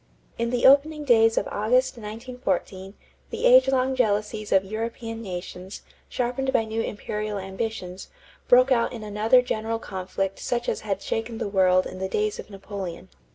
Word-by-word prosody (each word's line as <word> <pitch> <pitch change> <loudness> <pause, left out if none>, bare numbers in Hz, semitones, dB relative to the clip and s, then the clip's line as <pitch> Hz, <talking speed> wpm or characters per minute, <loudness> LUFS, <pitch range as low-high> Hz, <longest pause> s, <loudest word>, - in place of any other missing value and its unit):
= - - -35
In 235 0 0
the 245 0 0
opening 295 +3 +5
days 225 -4 +4
of - - +1
August, 250 +6 +1
1914, 210 -4 -4 0.3
the - - -3
age - - +7
long 265 0 +1
jealousies 215 -2 -1
of 195 0 +4
European 225 +2 -5
nations, 185 -1 -7 0.3
sharpened 255 +2 -1
by 225 - +2
new 220 +1 -2
imperial 210 -1 -4
ambitions, 190 -1 -5 0.4
broke 255 +2 +6
out 235 -1 +2
in 225 -3 -7
another 215 +4 +3
general 225 -1 -2
conflict 195 -1 -4
such 240 -1 -2
as - - -1
had 200 -2 -3
shaken 225 0 -3
the 230 - -3
world 185 -2 +3
in 185 - -7
the 190 0 -3
days 210 +1 -1
of - - -8
Napoleon. 195 - -7
220 Hz, 165 wpm, -25 LUFS, 195-245 Hz, 0.4 s, age